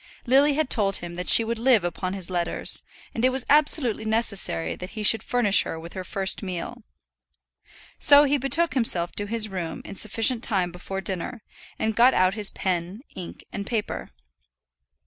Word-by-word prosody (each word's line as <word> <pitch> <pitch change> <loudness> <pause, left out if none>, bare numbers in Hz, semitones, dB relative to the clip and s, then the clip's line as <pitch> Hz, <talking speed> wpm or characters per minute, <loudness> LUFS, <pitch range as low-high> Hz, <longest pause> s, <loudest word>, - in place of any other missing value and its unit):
Lily 275 +3 +3
had 310 -1 0
told 200 -4 +1
him 175 0 -4
that 180 +1 -3
she 230 - +8
would 230 0 -4
live 235 -5 +3
upon 180 +2 -4
his 190 -2 -7
letters, 175 -1 0 0.3
and 230 - -4
it 255 - +4
was 260 -1 -4
absolutely 285 -7 +3
necessary 205 - -1
that 180 - -9
he 215 - -4
should 225 +1 +3
furnish 210 -6 +2
her 160 - -6
with 165 +1 -11
her 185 - -6
first 190 +1 0
meal. 180 -4 -6 1.2
So 285 0 +7
he 290 0 +1
betook 285 +4 +2
himself 185 -9 +1
to 205 - -6
his 225 0 0
room 180 -5 -6
in - - -9
sufficient 225 +4 +1
time 185 -6 0
before 195 +2 -7
dinner, 195 +5 -5 0.3
and 220 -1 -2
got 245 +3 +4
out 185 +1 +2
his 210 -2 0
pen, 185 +3 -4
ink, 180 -2 -9
and 200 - -4
paper. 220 -3 -4
210 Hz, 180 wpm, -24 LUFS, 185-245 Hz, 1.2 s, she